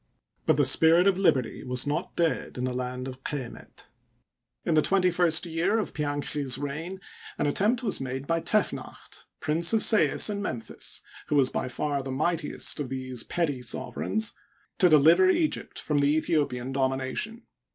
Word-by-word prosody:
But - - +4
the 145 - +4
spirit. 160 +6 +5
of 195 -1 +3
liberty 130 - +1
was 125 +1 +2
not 145 +1 -3
dead 165 -5 -1
in 125 - -3
the 130 0 -1
land 125 0 -4
of 130 0 -9
Q^met. 135 -5 -7 0.8
In 165 - +1
the 155 - +5
twenty 185 +2 +2
first 175 -1 +4
year 170 +6 0
of 220 - -2
Pianchi's 145 -2 -2
reign, 160 +7 -5 0.4
an - - 0
attempt 210 - +1
was 205 - -1
made 130 +1 -4
by 165 +2 0
Tefnacht, - - -2
Prince 160 +6 +1
of 220 - +3
Sais 220 - +4
and 205 -1 -3
Memphis, 125 - -5 0.2
who 150 - 0
was 135 -3 +4
by - - -2
far 140 +3 -2
the 135 - -7
mightiest 155 +4 -1
of 140 -4 -3
these 130 -2 -5
petty 145 -5 -2
sovereigns, 205 - -3 0.5
to 180 - +6
deliver 165 +5 +6
Egypt 315 - 0
from 150 -2 0
the 145 +2 +3
Aethiopian 135 -5 -1
domination. 135 - -2
150 Hz, 165 wpm, -27 LUFS, 130-175 Hz, 0.8 s, to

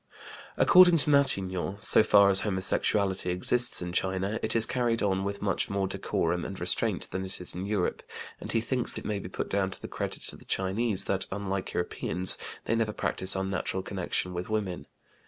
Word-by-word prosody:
According 180 -1 +6
to 150 -1 +1
Matignon, 100 -8 +2
so 110 - +5
far 100 -2 +5
as 95 - +7
homosexuality 95 -1 0
exists 120 +5 +2
in 90 0 -6
China, 95 +4 -1
it 110 - -1
is 115 -1 +7
carried 120 -3 -1
on 95 -1 0
with 100 0 -5
much 100 - -1
more 100 -1 -1
decorum 95 - -2
and - - -7
restraint - - 0
than 95 - -4
it 95 0 -4
is 90 - -4
in 90 +3 -5
Europe, 105 -4 -2 0.4
and - - -7
he 115 - 0
thinks 125 +1 0
it - - -8
may 105 -1 -2
be 90 - -8
put - - -5
down 95 -1 -1
to - - -7
the - - -8
credit - - -6
of - - -13
the - - -15
Chinese 95 +2 0
that, 95 -1 -1
unlike 95 -1 -4
Europeans, 90 +1 +1 0.3
they - - -1
never 115 -2 -1
practice 95 -1 +1
unnatural 95 0 -3
connection 90 -1 -3
with 90 +2 -5
women. 100 -5 -3
100 Hz, 190 wpm, -27 LUFS, 95-110 Hz, 0.4 s, as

